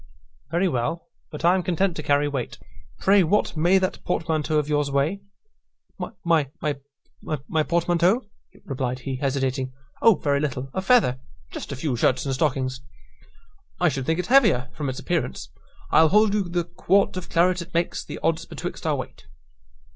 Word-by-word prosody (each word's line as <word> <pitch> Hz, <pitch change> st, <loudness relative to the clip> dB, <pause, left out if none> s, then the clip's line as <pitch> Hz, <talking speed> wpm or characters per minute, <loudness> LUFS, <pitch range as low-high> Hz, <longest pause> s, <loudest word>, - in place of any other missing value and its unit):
"Very 175 Hz, +4 st, +1 dB
well; 140 Hz, -, -2 dB, 0.2 s
but 150 Hz, +1 st, -5 dB
I 175 Hz, -, +6 dB
am 190 Hz, -, +1 dB
content 180 Hz, +1 st, 0 dB
to -, -, -4 dB
carry 145 Hz, 0 st, +2 dB
weight. 135 Hz, -5 st, -4 dB, 0.4 s
Pray, 195 Hz, +1 st, +4 dB
what 190 Hz, +4 st, +1 dB
may 175 Hz, +5 st, +4 dB
that 190 Hz, 0 st, -2 dB
portmanteau 160 Hz, -3 st, 0 dB
of 150 Hz, -1 st, +1 dB
yours 145 Hz, -1 st, +1 dB
weigh?" 140 Hz, +8 st, 0 dB, 1.0 s
"My 165 Hz, -3 st, +4 dB
p 145 Hz, +2 st, -3 dB, 0.7 s
p 155 Hz, +3 st, -1 dB
portmanteau?" 175 Hz, +7 st, +2 dB, 0.4 s
replied 130 Hz, -2 st, -2 dB
he, 130 Hz, 0 st, -4 dB
hesitating 135 Hz, -1 st, -1 dB, 0.3 s
"O 225 Hz, -3 st, +6 dB
very 140 Hz, -4 st, 0 dB
little 135 Hz, -2 st, -3 dB
a 190 Hz, -, -1 dB
feather 190 Hz, -, +3 dB, 0.3 s
just -, -, -7 dB
a -, -, -3 dB
few 135 Hz, -1 st, -2 dB
shirts 130 Hz, +3 st, +1 dB
and 135 Hz, -, -1 dB
stockings." 130 Hz, -2 st, -1 dB, 1.0 s
"I -, -, +4 dB
should 135 Hz, -1 st, -4 dB
think 160 Hz, -, +1 dB
it 180 Hz, -, -2 dB
heavier, 210 Hz, -, +4 dB
from 145 Hz, -3 st, -3 dB
its 130 Hz, -, -5 dB
appearance. 165 Hz, -, -2 dB, 0.4 s
I'll 160 Hz, 0 st, +6 dB
hold 210 Hz, +2 st, +4 dB
you 200 Hz, -4 st, 0 dB
the 175 Hz, 0 st, 0 dB
quart 185 Hz, +3 st, +1 dB
of 185 Hz, -1 st, -6 dB
claret 180 Hz, +1 st, +2 dB
it 170 Hz, -, -10 dB
makes 170 Hz, +1 st, 0 dB
the -, -, -7 dB
odds 165 Hz, 0 st, +1 dB
betwixt -, -, -6 dB
our -, -, +2 dB
weight." -, -, -8 dB
160 Hz, 170 wpm, -24 LUFS, 135-180 Hz, 1.0 s, I